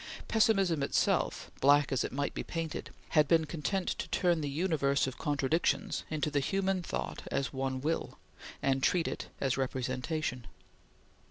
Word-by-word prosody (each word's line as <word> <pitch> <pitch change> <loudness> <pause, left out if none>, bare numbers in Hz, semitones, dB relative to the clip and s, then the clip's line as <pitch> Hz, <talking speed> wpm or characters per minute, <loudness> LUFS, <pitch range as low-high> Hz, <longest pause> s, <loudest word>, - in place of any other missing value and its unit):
Pessimism 195 - +3
itself, 140 - +1
black 145 +1 +5
as 135 - +1
it - - -3
might 140 +2 -2
be - - -3
painted, 165 -2 -4 0.2
had 150 -1 +4
been 160 0 +4
content 175 +5 -2
to - - -3
turn 175 -3 +2
the 145 - -2
universe 140 -3 +1
of 130 -1 -5
contradictions 145 +3 0
into 155 -1 -1
the 145 - +2
human 195 +5 0
thought - - -4
as 135 -3 -1
one 130 -1 -2
Will, 160 +3 -2 0.5
and 135 0 +2
treat 170 +4 +2
it - - -4
as 135 -2 0
representation. 130 - -2
145 Hz, 155 wpm, -31 LUFS, 135-165 Hz, 0.5 s, black